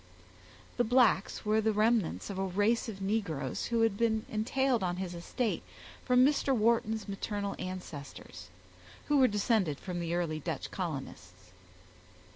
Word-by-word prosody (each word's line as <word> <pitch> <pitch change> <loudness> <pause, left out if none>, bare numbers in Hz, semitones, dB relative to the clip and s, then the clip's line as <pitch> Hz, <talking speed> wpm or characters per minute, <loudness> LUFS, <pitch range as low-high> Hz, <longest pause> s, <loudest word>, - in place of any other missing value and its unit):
The 245 - +3
blacks 240 -4 +2
were 215 +1 +3
the 220 0 +2
remnants 215 -3 +1
of 190 - -5
a - - +1
race 205 +5 +1
of 195 -3 -7
negroes 195 -7 -2
which 235 -1 +1
had 220 -3 +2
been 220 -1 +1
entailed 245 +2 +1
on 175 -1 -1
his 185 -1 -4
estate 200 +7 -2 0.4
from 250 0 +5
Mr. 275 -1 +2
Wharton's 220 -1 +1
maternal 200 0 -3
ancestors, 145 - -8 0.6
who 295 - +4
were 260 - +6
descended 205 - +1
from 180 -2 -5
the 170 0 -2
early 165 -3 -1
Dutch - - -4
colonists. 105 - -6
205 Hz, 145 wpm, -31 LUFS, 175-230 Hz, 0.6 s, were